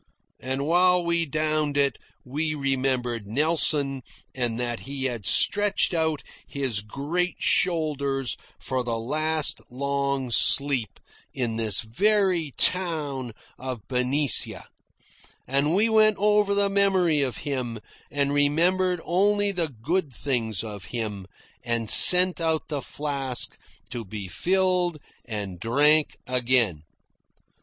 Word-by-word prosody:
And 130 +2 -3
while 180 +2 +3
we 170 -1 0
downed 155 0 -1
it, 140 -1 +2 0.3
we 155 +4 -2
remembered 130 -5 -1
Nelson 140 +1 +2 0.3
and 120 -2 -2
that 120 -1 -2
he 135 0 -6
had 120 -6 -3
stretched 205 -2 +1
out 160 -4 -1 0.2
his 130 -7 -2
great 150 - -3
shoulders 140 -6 0 0.2
for 130 -1 -3
the 115 -1 -2
last 155 +6 +1
long 140 0 -2
sleep 135 -1 +2 0.4
in 120 -4 -2
this 110 -4 +1
very 180 - +1
town 150 -9 0 0.3
of 130 -4 -6
Benicia; 130 +1 -1 0.8
and 140 +5 0
we 210 +4 +3
wept 215 -2 +3
over 210 0 +2
the 200 0 +2
memory 190 -6 +2
of 130 -3 -2
him, 130 -5 -3 0.3
and 140 0 -1
remembered 175 +5 +1
only 205 +3 +2
the 175 -4 -1
good 145 - -2
things 115 -5 -2
of 105 -5 -8
him, 105 -2 -5 0.4
and 115 -2 -1
sent 180 -1 +7
out 160 -1 -1
the 145 -3 -3
flask 140 -4 -3 0.4
to 120 - -5
be 100 -1 -7
filled 180 - 0 0.3
and 100 -6 -6
drank 145 - +2
again. 125 -9 +1
140 Hz, 120 wpm, -25 LUFS, 125-170 Hz, 0.8 s, sent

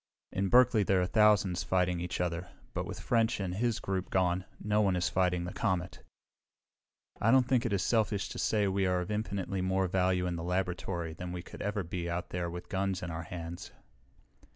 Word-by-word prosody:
"In 95 0 -1
Berkeley 125 -1 +6
there 95 -1 +3
are 90 - +2
thousands 100 -3 +4
fighting 90 -1 +1
each 90 0 -3
other, 85 0 -2 0.2
but - - -3
with - - -6
French 115 -2 +1
and 95 -2 -2
his 115 +3 0
group 95 -1 -3
gone, 90 0 +1
no 105 0 +1
one 95 -3 +2
is 90 -3 +1
fighting 90 -1 +1
the 90 - -5
comet. 95 -6 -1 1.2
I 110 - +3
don't 130 0 +5
think 125 -2 +2
it - - -4
is 100 -4 +1
selfish 110 -4 +1
to - - -6
say 105 -2 +2
we 95 0 +1
are 90 -1 +1
of 90 - -5
infinitely 100 -3 -2
more 95 +1 +1
value 90 0 +1
in 90 -1 -2
the 80 - -5
laboratory 90 -2 -2
than 90 +2 -6
we 90 -1 -5
could - - -10
ever 105 -1 -1
be 85 0 -4
out 85 0 -3
there 90 -1 -2
with 90 +1 -7
guns 95 0 -1
in 85 - -4
our 80 0 -4
hands." 85 +1 -7
95 Hz, 205 wpm, -31 LUFS, 90-100 Hz, 1.2 s, Berkeley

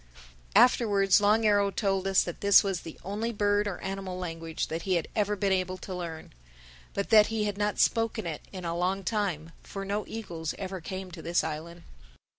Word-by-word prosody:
Afterwards 205 -5 +5
Long 215 +2 +3
Arrow 205 -1 +4
told 195 -2 0
us 195 -1 +4
that 175 - -7
this 200 -1 +7
was 195 -3 -2
the 165 - -10
only 210 +4 -2
bird 205 -1 +1
or 195 - -3
animal 190 -1 -4
language 165 -2 -4
that 165 +1 -3
he 185 +1 0
had 170 - -1
ever 210 0 +1
been 200 0 0
able 185 0 0
to 185 +1 -7
learn. 170 -3 -6 0.6
But 200 - -2
that 215 -1 +8
he 225 -1 -1
had 205 -1 -1
not 205 0 -1
spoken 225 -2 +1
it 160 -3 -4
in 185 -2 -7
a 170 0 -2
long 185 +3 0
time, 180 -6 -2
for 195 0 -7
no 205 +2 -1
eagles 170 -8 -5
ever 190 -2 -5
came 185 +2 -6
to 170 -2 -9
this 170 +2 +1
island. 165 +2 -6
195 Hz, 200 wpm, -28 LUFS, 175-205 Hz, 0.6 s, that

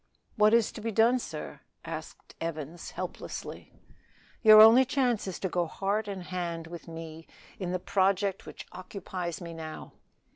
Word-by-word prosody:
"What 215 +1 +5
is 235 -2 +2
to 220 - -9
be 225 +1 -2
done, 230 +4 +4
sir?" - - -7 0.3
asked - - -8
Evans 165 0 -5
helplessly. - - -7 0.7
"Your 215 -2 +9
only 225 +4 +9
chance 250 -5 0
is 185 - -4
to 190 - 0
go 175 -1 -1
heart 200 +6 -1
and 195 -3 -5
hand 175 -2 -4
with 170 +1 -10
me 165 -1 -9 0.3
in 180 -2 -3
the 185 - 0
project 195 +1 0
which - - -9
occupies 185 -1 -6
me 170 -1 -7
now." 160 -1 -8
185 Hz, 155 wpm, -29 LUFS, 170-215 Hz, 0.7 s, Your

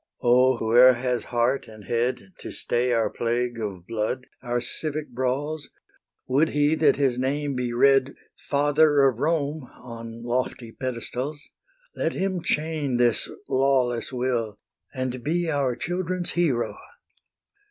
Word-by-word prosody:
O, 125 +1 +4
whoe'er 120 +3 +6
has 125 0 -2
heart 120 +3 0
and 110 -1 -12
head 120 - -2
To - - -7
stay 125 +1 -1
our 115 -2 +1
plague 120 0 -1
of 95 -5 -5
blood, 115 +4 -2 0.2
our 120 -1 -1
civic 150 +4 -4
brawls, 140 +5 -2 0.6
Would 145 +5 +2
he 145 +1 +2
that 160 0 +4
his 135 -3 +1
name 140 +2 -1
be 125 -2 -2
read 135 +2 +4 0.2
"Father 145 +1 +3
of 125 -3 -1
Rome" 150 -2 -1
on 115 -1 -9
lofty 120 -1 -2
pedestals, 130 +4 -4 0.5
Let - - -1
him 190 -2 -1
chain 150 -5 -1
this 120 -1 +2 0.2
lawless 130 -3 +1
will, 120 -4 -1 0.3
And 130 -2 -4
be 170 +2 0
our 135 -4 0
children's 180 +2 -2
hero! 120 -11 0
130 Hz, 130 wpm, -25 LUFS, 120-145 Hz, 0.6 s, whoe'er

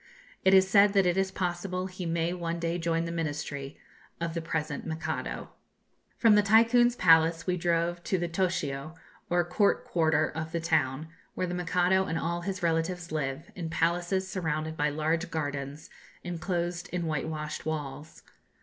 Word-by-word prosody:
It 190 0 +6
is 190 0 +6
said 200 +1 +5
that 195 -2 +4
it 175 -1 +2
is 195 0 +1
possible 180 0 -2
he 185 -1 -5
may 165 +1 0
one 170 -1 -3
day 170 +1 -2
join 165 0 0
the 170 - -4
ministry 145 -3 -4 0.4
of 170 -1 -2
the 170 - -2
present 160 -3 -3
Mikado. 160 0 -4 0.7
From 225 -2 +5
the 210 - +6
Tycoon's 230 +4 +5
palace 165 -3 +4
we 180 - +1
drove 170 0 0
to 190 - +1
the 175 -1 -1
'Toshio,' 160 -4 -2 0.3
or 175 0 +2
court 200 +4 +2
quarter 160 -2 +2
of 160 +1 -5
the 170 - 0
town, 155 -2 0 0.3
where 185 - -1
the 175 - -4
Mikado 180 +2 +2
and 165 - -1
all 170 +1 -2
his 190 0 -4
relatives 165 +1 0
live, 150 +1 -3
in 165 -2 -5
palaces, 175 +3 0
surrounded 160 -4 -2
by 150 -1 +1
large 160 +3 -1
gardens, 145 -1 -4 0.3
enclosed 175 0 -3
in 180 -1 -2
whitewashed 155 0 -3
walls. 150 -1 -5
170 Hz, 165 wpm, -29 LUFS, 160-180 Hz, 0.7 s, It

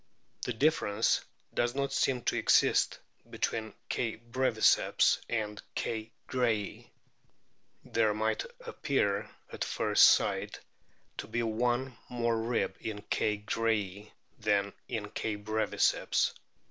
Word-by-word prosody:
The 125 - -2
difference 115 -5 +2 0.3
does 120 +1 0
not 140 0 -1
seem 125 -3 +1
to - - 0
exist - - +3 0.3
between 110 -1 -2
K. 115 -2 -1
breviceps 120 -1 +3
and 105 -3 -2
K. 110 0 -3 0.2
grayi. 115 -5 -1 1.0
There 110 -2 +2
might 110 - -1 0.2
appear 135 - 0 0.2
at - - -2
first - - +4
sight - - +3 0.6
to - - -4
be 120 +2 -1
one 120 +3 0
more 115 -2 0
rib 115 +1 -1
in 105 -2 -5
K. 105 -1 +1
grayi 105 -3 -1 0.3
than 100 -1 +1
in 105 -3 -4
K. 110 - -2
breviceps. 110 +1 +1
110 Hz, 110 wpm, -31 LUFS, 105-120 Hz, 1.0 s, first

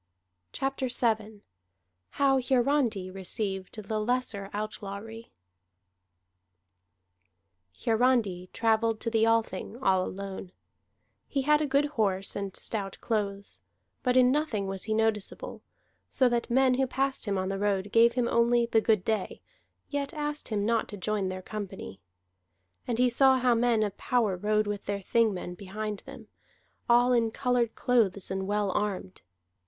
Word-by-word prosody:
CHAPTER 270 -1 -2
VII 220 -4 -1 0.7
HOW 270 -1 +4
HIARANDI 245 -7 +1
RECEIVED 195 +1 -4
THE 215 -1 -1
LESSER 215 -3 -1
OUTLAWRY 215 +2 -6 2.5
Hiarandi 225 -6 +2
travelled 225 -1 +1
to 230 - -2
the 225 0 +3
Althing 225 0 0
all 190 -8 +2
alone; 190 -1 -6 0.7
he 275 -2 -1
had 300 +2 +4
a 300 - 0
good 280 +1 +3
horse 205 -9 -1
and 200 -1 -4
stout 200 -4 -3
clothes, 200 -3 -3 0.4
but 250 -1 +2
in 250 0 +6
nothing 275 -9 0
was 195 -1 -4
he 220 -1 0
noticeable, 220 -2 -1 0.5
so 260 - +3
that 240 0 -1
men 260 +1 +4
who 265 +1 +1
passed 270 0 -1
him 200 -1 0
on 185 0 -1
the 195 0 -3
road 200 -1 0
gave 230 +1 +5
him 245 -1 +1
only 235 0 +3
the 225 -1 +2
good 215 -4 +2
day, 220 -4 -1 0.5
yet 285 +2 -3
asked 295 0 -3
him 205 -3 -1
not 230 0 +1
to 205 - -7
join 200 0 -1
their 185 0 -6
company. 195 - -7 0.9
And 235 - -1
he 250 +1 +4
saw 265 +2 +5
how 250 -1 +3
men 230 -1 +2
of 205 -2 -3
power 230 -6 +1
rode 210 +3 +1
with 205 -1 -4
their 200 0 -2
Thingmen 195 -4 0
behind 205 +2 -5
them, - - -10 0.6
all 245 +1 +5
in 230 -2 +3
colored 245 -1 0
clothes 205 -7 +1
and 190 0 -2
well 205 -1 0
armed. 195 -2 -3
220 Hz, 145 wpm, -28 LUFS, 200-245 Hz, 2.5 s, in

